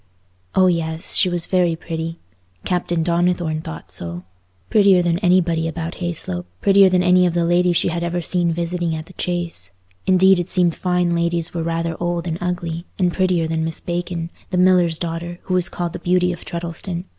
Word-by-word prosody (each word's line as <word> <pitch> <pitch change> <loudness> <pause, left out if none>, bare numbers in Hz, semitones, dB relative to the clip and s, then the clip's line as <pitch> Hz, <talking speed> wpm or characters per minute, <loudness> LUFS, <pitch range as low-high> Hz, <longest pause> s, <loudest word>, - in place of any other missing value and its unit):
Oh 190 - +5
yes! 165 -2 +1
She 185 - +3
was 175 -1 +2
very 180 -3 +2
pretty. 165 0 -5 0.5
Captain 175 -2 0
Donnithorne 170 -2 0
thought 80 - -9
so. 85 -1 -6 0.5
Prettier 195 -4 +5
than 170 0 +1
anybody 175 -4 +2
about 165 +1 -5
Hayslope—prettier 175 - +2
than 180 -1 +2
any 180 0 +5
of 170 - -2
the 170 -1 +2
ladies 175 0 +3
she - - +1
had 170 +1 -2
ever 170 +1 -1
seen 175 0 0
visiting 170 0 -2
at 155 0 -6
the 185 - -15
Chase—indeed 175 - 0
it 175 +1 -3
seemed 175 -3 +2
fine 180 -1 0
ladies 170 0 -1
were 170 - -2
rather 165 0 -2
old 175 0 -1
and 165 0 -3
ugly—and 175 0 -2
prettier 180 -3 +1
than 160 0 -1
Miss 160 0 -2
Bacon, 175 -1 -4 0.2
the 180 - -2
miller's 180 -3 +4
daughter, 170 +1 -4
who 185 - -3
was 180 -1 +1
called 175 -2 -4
the - - -5
beauty 180 0 +1
of 170 - -10
Treddleston. 170 +1 -4
175 Hz, 180 wpm, -20 LUFS, 165-180 Hz, 0.5 s, Oh